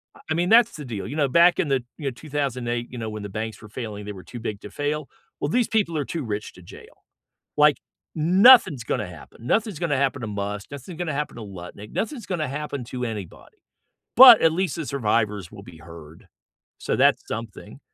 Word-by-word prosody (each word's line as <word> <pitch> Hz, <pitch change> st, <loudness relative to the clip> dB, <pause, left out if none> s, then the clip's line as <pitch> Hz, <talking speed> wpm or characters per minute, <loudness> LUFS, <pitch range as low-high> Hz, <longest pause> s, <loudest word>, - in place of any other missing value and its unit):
Uh, -, -, -17 dB
I -, -, +4 dB
mean 175 Hz, +1 st, 0 dB
that's 230 Hz, +1 st, +5 dB
the 150 Hz, -, -8 dB
deal. 110 Hz, -5 st, -5 dB
You 145 Hz, -, -6 dB
know, 145 Hz, -, +2 dB
back 170 Hz, +6 st, +4 dB
in 160 Hz, -, +1 dB
the 135 Hz, -3 st, +1 dB
you 150 Hz, -, -8 dB
know, 135 Hz, -, 0 dB
2008, 125 Hz, -4 st, -3 dB
you 125 Hz, -, -8 dB
know, 110 Hz, -2 st, -4 dB
when 105 Hz, -1 st, -7 dB
the 100 Hz, -, -6 dB
banks 110 Hz, +2 st, -5 dB
were 110 Hz, -, -12 dB
failing, 105 Hz, -3 st, -7 dB
they 105 Hz, -, -6 dB
were 95 Hz, -, -11 dB
too 120 Hz, -, -9 dB
big 105 Hz, -3 st, -5 dB
to 105 Hz, -, -10 dB
fail. 145 Hz, 0 st, -3 dB, 0.3 s
Well, 145 Hz, -, -1 dB
these 245 Hz, +5 st, +1 dB
people 200 Hz, -7 st, 0 dB
are 145 Hz, -, -1 dB
too 165 Hz, -4 st, -4 dB
rich 105 Hz, -2 st, -5 dB
to 90 Hz, -, -15 dB
jail. -, -, -15 dB, 0.5 s
Like, 150 Hz, -1 st, +5 dB, 0.4 s
nothing's 180 Hz, -, +6 dB
gonna 90 Hz, -, -2 dB
happen. 90 Hz, +7 st, -13 dB
Nothing's 215 Hz, -6 st, 0 dB
gonna 160 Hz, -5 st, 0 dB
happen 135 Hz, -1 st, 0 dB
to 110 Hz, -, -4 dB
Musk, 100 Hz, 0 st, -5 dB
nothing's 140 Hz, +5 st, -9 dB
gonna 170 Hz, -4 st, -2 dB
happen 150 Hz, +1 st, -3 dB
to 115 Hz, -, -8 dB
Lutnick, 100 Hz, +1 st, -10 dB
nothing's 240 Hz, -1 st, -4 dB
gonna 170 Hz, -5 st, -2 dB
happen 140 Hz, -2 st, -5 dB
to 125 Hz, +1 st, -5 dB
anybody, 105 Hz, -6 st, -8 dB, 0.6 s
but 250 Hz, -2 st, +11 dB
at 165 Hz, -, +5 dB
least 185 Hz, +2 st, -1 dB
the 165 Hz, -, -5 dB
survivors 105 Hz, -, -1 dB
will -, -, -12 dB
be 80 Hz, -, -13 dB
heard. 80 Hz, -1 st, -13 dB, 0.5 s
So -, -, -2 dB
that's -, -, +3 dB
something. 115 Hz, -1 st, -7 dB
130 Hz, 220 wpm, -24 LUFS, 105-155 Hz, 0.6 s, but